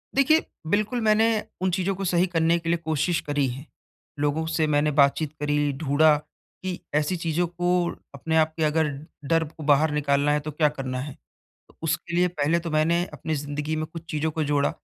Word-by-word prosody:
देखिए, 310 +4 +4 0.2
बिल्कुल 215 +6 0
मैंने 220 0 +4 0.3
उन 185 - +1
चीज़ों 190 +2 0
को 195 +1 -4
सही 175 +1 +2
करने 165 -1 +2
के 165 0 -4
लिए 170 - +2
कोशिश 160 +2 +1
करी 145 -2 0
है, 130 +3 -6 0.5
लोगों 145 +2 0
से 160 -1 +1
मैंने 150 0 +2
बातचीत 140 +2 +3
करी, 145 0 +1
ढूँढ़ा 150 +2 +3
कि 180 +4 -9 0.2
ऐसी 150 +5 +1
चीज़ों 170 +1 0
को 175 0 0 0.2
अपने 160 +4 -1
आप 160 0 +3
के 160 - 0
अगर 155 0 +2 0.4
डर 165 +3 +2
को 155 +1 -11
बाहर 150 +1 +4
निकालना 145 0 +1
है, 150 - +2
तो 150 +1 -6
क्या 150 +1 +2
करना 130 -3 -4
है? 140 +1 -6 0.7
उसके 165 +2 -2
लिए 180 0 +4
पहले 160 -1 +1
तो 165 - -5
मैंने 165 +3 +2
अपनी 160 - -3
ज़िंदगी 145 +1 -3
में 155 0 -2
कुछ 165 +1 -10
चीज़ों 155 0 -1
को 155 0 -2
जोड़ा, 145 -1 +1
155 Hz, 195 wpm, -25 LUFS, 145-170 Hz, 0.7 s, देखिए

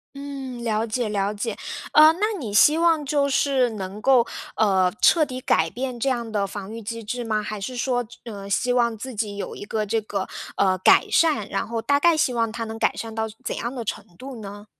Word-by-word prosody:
嗯， 270 -3 -7
了 225 -1 0
解 225 0 -1
了 200 0 -1
解， 210 +2 -3 0.4
呃， 310 +1 +8
那 420 +4 -1
你 220 -8 -5
希 295 +9 +6
望 325 -3 +3
就 280 -1 +1
是 265 -2 +2
能 200 -1 -6
够， 255 -1 +5 0.3
呃， 190 -4 +3
彻 325 -3 +5
底 255 -3 -6
改 160 -7 +2
变 250 +1 -5
这 270 - +1
样 235 -3 -2
的 200 -2 0
防 205 +1 -7
御 230 - -7
机 230 +1 -6
制 240 +3 -4
吗？ 215 -2 0
还 210 0 -5
是 255 +5 -5
说， 245 0 0
这 245 +2 -15 0.2
呃， 200 -1 -8
希 245 +5 +1
望 235 -2 +1
自 260 +4 -7
己 210 -2 -3
有 - - -5
一 - - -8
个 215 +1 -2
这 225 +2 0
个， 200 -2 -4 0.3
呃， 190 -1 +2
改 - - +5
善， 295 -11 +3
然 195 - -2
后 230 -1 -3
大 285 +3 +2
概 340 +1 +4
希 255 - +2
望 230 -2 0
它 230 +1 -4
能 225 0 -6
改 - - +1
善 225 -1 -6
到 220 0 -2 0.2
怎 - - -3
样 235 +3 -3
的 240 - -4
程 215 - -4
度 255 -3 -8
呢？ 205 +1 -9
230 Hz, 245 characters per minute, -23 LUFS, 210-260 Hz, 0.4 s, 呃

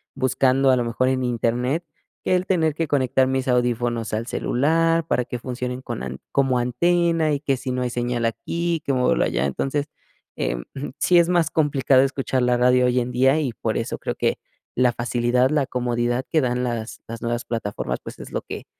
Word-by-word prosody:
buscando 135 0 +2
a - - +5
lo 120 - +1
mejor 120 +2 0
en 130 -1 0
Internet 125 +6 0 0.4
que 185 - +2
el 180 0 0
tener 160 -6 +1
que 165 -1 -2
conectar 130 -2 +2
mis 130 0 -1
audífonos 120 -2 0
al 110 +2 -2
celular 165 +6 +1
para 125 - +1
que 125 0 -6
funcionen 125 +1 -4
con 120 - -5
an 65 0 -6
como 135 -2 +2
antena 165 +5 +2
y 145 - 0
que 140 -2 0
si 130 0 -5
no 125 0 -1
hay 125 - 0
señal 120 -1 -1
aquí, 170 +8 -2
que - - 0
muévalo 125 -2 +2
allá. - - 0
Entonces, 135 - -1 0.5
em, - - -2 0.3
sí 180 - +4
es 170 0 +3
más 175 -2 +2
complicado 140 -4 +3
escuchar 135 -1 -1
la 125 0 +2
radio 125 +1 +4
hoy 125 0 +2
en 125 0 -2
día 130 +4 +4
y 135 -6 -2
por - - -2
eso - - -3
creo - - -3
que - - 0 0.4
la 125 0 +3
facilidad, 120 +1 +1
la 150 -2 +1
comodidad 120 0 -1
que 160 - +2
dan 125 -1 0
las 120 -2 -4
las 115 0 -7
nuevas 120 0 -2
plataformas, 110 -3 -3
pues - - -9
es - - -9
lo - - -1
que - - -8
125 Hz, 200 wpm, -23 LUFS, 120-145 Hz, 0.5 s, a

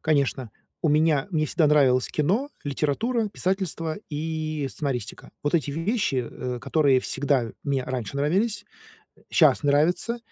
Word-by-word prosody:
Конечно, 140 -5 0 0.3
у 160 - +2
меня 150 -1 +3
мне 155 -3 +1
всегда 155 +1 +2
нравилось 135 -4 +4
кино, 200 - 0 0.2
литература, 205 - 0
писательство 185 -5 -2
и 155 -2 -3
сценаристика. 130 -7 -4
Вот 145 +2 -1
эти 150 -3 +1
вещи, 165 - -1
э, 125 -1 -5
которые 140 -5 +3
всегда 135 -4 0
мне 140 -2 0
раньше 130 0 -4
нравились, 200 +9 0 0.7
щас - - +4
нравятся, 160 +11 +2
150 Hz, 130 wpm, -25 LUFS, 140-165 Hz, 0.7 s, нравилось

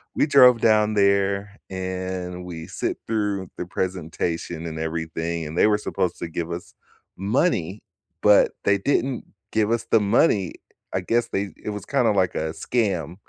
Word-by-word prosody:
we - - +3
drove 125 -5 +7
down 110 -1 +4
there, 100 0 +2
and 95 -1 -4
we 80 -2 -7
sit - - -3
through 105 -4 -1
the - - -4
presentation 85 -2 -3
and 80 -1 -5
everything, 80 0 -3
and 80 +3 -7
they - - +5
were 105 -1 +3
supposed 90 -4 -2
to - - -4
give 85 +1 -4
us 85 +1 -6 0.4
money, 100 - 0 0.4
but 105 -1 +6
they 100 0 +4
didn't 130 +2 0 0.3
give 110 0 +1
us 115 0 0
the 115 - +6
money. 100 - +2 0.4
I 95 - +1
guess 115 +6 0
they 100 0 -2
it - - -3
was 105 -3 -6
kinda 125 -5 +2
like 95 -3 +1
a 80 0 -1
scam, 90 - -1
95 Hz, 165 wpm, -24 LUFS, 85-105 Hz, 0.4 s, drove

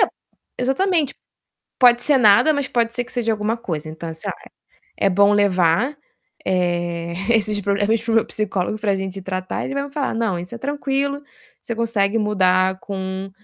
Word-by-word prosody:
É, - - +6 0.5
exatamente. 290 +3 +1 0.6
Pode 245 -1 +6
ser 290 -3 +4
nada, 220 +6 +6
mas 285 -2 -1
pode 235 -1 0
ser 245 - -1
que 250 - -10
seja 235 -2 0
alguma 215 +2 -1
coisa. 160 -9 -5
Então, 160 +1 -6
sei 160 - -7
lá, - - -11 0.5
é 195 - +2
bom 200 +2 +4
levar, 200 - +2 0.5
eh, 175 -2 -1 0.2
esses 215 -2 +2
proble 200 +1 0
esse 230 0 -2
para 230 - -1
o - - +2
meu 225 - +3
psicólogo 210 -1 -2
pra 205 -2 +1
gente 190 0 -5
tratar 185 0 -4
e - - -4
ele 275 - -4
vai 280 - -1
me 280 - -13
falar: 285 -5 -2
"Não, 225 -6 0
isso 180 +6 -7
é - - -7
tranquilo, 280 +1 -2 0.4
você 235 - -4
consegue 225 -2 +1
mudar 190 -3 +2
com 190 -1 -5
210 Hz, 190 wpm, -21 LUFS, 185-245 Hz, 0.6 s, É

